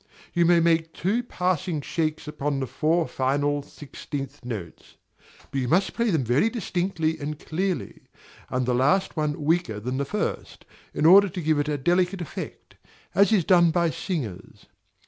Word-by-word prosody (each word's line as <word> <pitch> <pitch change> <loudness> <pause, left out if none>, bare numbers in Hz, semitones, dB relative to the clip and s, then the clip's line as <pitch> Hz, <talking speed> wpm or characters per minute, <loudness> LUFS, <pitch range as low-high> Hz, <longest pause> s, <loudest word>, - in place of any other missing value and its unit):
You 175 -1 +3
may 175 -1 +5
make 165 -1 +1
two 210 +7 0
passing 180 -7 -1
shakes 155 +1 -2
upon 145 -2 -2
the 135 - -1
four 160 +6 0
final 145 +2 0
sixteenth 145 -1 -8
notes; 110 -9 -8 0.5
but 135 - -1
you 125 - -2
must 180 +9 +2
play 235 -1 0
them 160 -8 +1
very 125 - +2
distinctly 175 -7 -2
and 150 +1 -4
clearly, 180 +4 -3 0.4
and 130 0 -1
the 125 - +1
last 145 +10 +2
one 150 -1 -2
weaker 160 -10 +1
than 125 +4 -3
the 140 - -1
first, 210 +9 -4 0.3
in 150 - -1
order 195 +4 +8
to 180 - -6
give 155 -1 +2
it 145 +1 -1
a 150 - 0
delicate 180 +6 +1
effect, 170 - -8 0.4
as 200 +3 +4
is 195 -7 +3
done 175 -2 +5
by 170 0 +1
singers. 125 - -5
160 Hz, 165 wpm, -25 LUFS, 140-180 Hz, 0.5 s, order